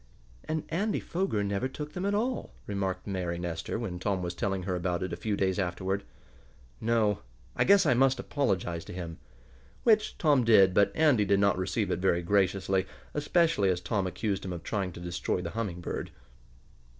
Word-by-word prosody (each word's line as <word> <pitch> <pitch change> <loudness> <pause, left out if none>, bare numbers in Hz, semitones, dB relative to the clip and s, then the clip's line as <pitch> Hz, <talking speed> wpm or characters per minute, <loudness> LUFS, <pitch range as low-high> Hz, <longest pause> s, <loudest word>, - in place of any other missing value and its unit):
"And 155 0 -2
Andy 200 +6 0
Foger 170 - -1
never 100 +5 -1
took 150 +3 -7
them 185 +2 -2
at 205 - +1
all," 245 +4 -2
remarked 95 -2 -2
Mary 90 -4 -2
Nestor, 85 +1 -3
when 100 -6 -4
Tom 95 -1 -1
was 85 0 -3
telling 95 +1 -2
her 90 0 -1
about 90 0 -1
it 95 - -3
a - - 0
few 105 -2 -2
days 95 0 +1
afterward. 95 +2 -1 0.8
"No. 110 -3 +2 0.4
I - - +2
guess 200 0 +6
I - - +5
must 135 +2 +3
apologize 90 - -1
to - - -8
him." 85 -3 -6 0.6
Which 215 -2 +3
Tom 145 -6 +4
did, 100 -5 +6
but 100 +1 +4
Andy 150 -9 +4
did 100 0 +3
not 100 -1 +4
receive 95 +2 -1
it 85 - 0
very 85 -2 +2
graciously, 95 0 +1 0.3
especially 150 - +2
as 90 -1 +1
Tom 95 +1 -1
accused 95 +2 -2
him 95 - -4
of 85 -1 -7
trying 95 -2 -2
to - - -9
destroy 90 +1 -2
the 85 -1 -4
Humming 100 -6 -3
Bird. - - -4
100 Hz, 185 wpm, -29 LUFS, 90-125 Hz, 0.8 s, guess